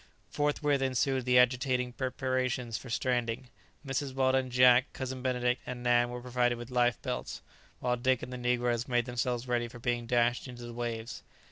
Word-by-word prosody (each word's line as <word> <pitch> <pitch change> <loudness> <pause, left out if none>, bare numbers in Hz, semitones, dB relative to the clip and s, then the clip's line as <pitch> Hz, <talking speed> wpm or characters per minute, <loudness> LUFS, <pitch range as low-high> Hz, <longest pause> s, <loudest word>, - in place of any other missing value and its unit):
Forthwith 145 -1 +1
ensued 130 0 +1
the 125 0 +4
agitating 125 0 +2
preparations 130 -2 -2
for 125 - -6
stranding. 120 +1 -1 0.4
Mrs. 135 0 -3
Weldon, 130 -1 +2
Jack, 125 +1 +5
Cousin 130 -1 -5
Benedict, 125 -1 0
and 125 -1 -5
Nan 120 0 +3
were 120 0 -6
provided 125 -1 +1
with 120 +1 -9
life 120 -2 +2
belts, - - -4 0.4
while 125 0 +1
Dick 130 0 +1
and 125 - -6
the - - -4
negroes 120 -1 0
made 120 -2 +1
themselves 125 0 -2
ready 120 -1 0
for 120 - -11
being 120 0 -2
dashed 120 +1 +1
into 120 -1 -9
the 120 - -8
waves. 115 -1 -4
125 Hz, 170 wpm, -30 LUFS, 120-130 Hz, 0.4 s, Jack